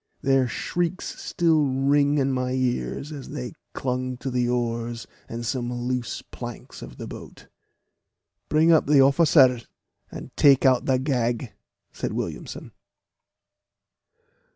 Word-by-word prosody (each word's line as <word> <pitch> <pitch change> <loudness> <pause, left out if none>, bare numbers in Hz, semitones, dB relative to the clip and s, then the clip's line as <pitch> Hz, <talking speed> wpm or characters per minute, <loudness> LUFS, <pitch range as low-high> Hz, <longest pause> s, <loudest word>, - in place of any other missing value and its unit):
Their 135 -1 +3
shrieks 175 +8 -3
still 160 -5 +2
ring 140 +2 +2
in 135 -1 +1
my 130 0 -1
ears 130 - -2
as 140 -3 -8
they 60 - -6 0.2
clung 130 -1 -2
to 130 +1 -5
the 125 -1 0
oars 120 -1 -2 0.2
and 120 +1 -5
some 120 0 -2
loose 125 0 -3
planks - - -9
of - - -10
the - - -6
boat. - - -10 1.0
"Bring 160 +2 +4
up 160 - +4
the 145 -1 +5
officer, 135 -3 +5 0.5
and - - -9
take 140 -2 +5
out 130 -2 +4
the 130 -1 +3
gag," 125 -3 -1 0.4
said - - -4
Williamson. - - -5
130 Hz, 130 wpm, -24 LUFS, 120-140 Hz, 1.0 s, the